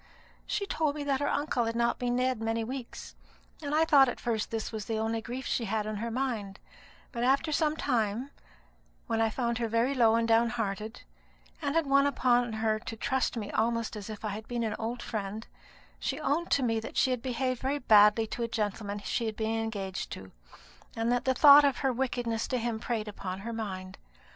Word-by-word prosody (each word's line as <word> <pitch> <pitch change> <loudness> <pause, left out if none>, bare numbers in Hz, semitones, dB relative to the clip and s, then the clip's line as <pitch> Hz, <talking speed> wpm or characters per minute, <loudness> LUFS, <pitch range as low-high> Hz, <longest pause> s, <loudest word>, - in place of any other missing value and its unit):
She 405 - -1
told 310 -6 0
me 295 - -4
that 275 -2 0
her 285 - 0
uncle 285 -5 0
had 230 0 -2
not 235 0 +1
been 245 -1 0
dead 255 -2 0
many 225 0 -1
weeks, 250 +1 -7 0.5
and 295 0 -2
I 320 +1 +4
thought 275 -5 +6
at - - -5
first 225 -2 -1
that 225 - -2
this 220 - -5
was 215 -2 -5
the 225 - -2
only 225 +1 -1
grief 245 +3 -6
she 235 - -1
had 215 0 -1
on 215 -1 -3
her 230 +3 -3
mind; 225 -6 -3 0.5
but 235 -2 -3
after 275 +5 +2
some 305 0 +1
time, 240 0 -1 0.7
when 225 0 0
I 225 - +3
found 235 0 -1
her 230 - 0
very 230 +4 +1
low 230 -4 +4
and 230 0 +1
downhearted, 225 -2 0 0.6
and 285 - -1
had 330 -1 +3
won 275 0 +4
upon 245 -3 +2
her 220 0 0
to 230 +1 -7
trust 260 +1 -1
me 205 -2 -4
almost 230 0 0
as 210 0 -7
if 215 0 -7
I - - -1
had 215 +2 -6
been 240 -1 -2
an 220 - -1
old 235 +2 -3
friend, 215 0 -4 0.5
she 270 - -2
owned 310 +4 0
to 280 - +2
me 225 -2 +1
that 220 - -7
she 260 - +3
had 250 -2 -1
behaved 255 0 -2
very 270 +2 0
badly 215 -3 +5
to 235 - -6
a 235 - 0
gentleman 210 -2 -2
she 235 -2 -1
had 220 - -3
been 225 +1 -1
engaged 200 -4 -4
to, 95 0 -9 0.6
and 230 +1 0
that 245 0 0
the 260 0 +2
thought 290 +2 +9
of 280 -3 +2
her 265 - +3
wickedness 240 -3 -1
to 255 - -1
him 235 -2 -2
preyed 220 -2 -2
upon 195 -2 -5
her 230 +3 -5
mind. 190 -4 -5
230 Hz, 215 wpm, -29 LUFS, 220-260 Hz, 0.7 s, thought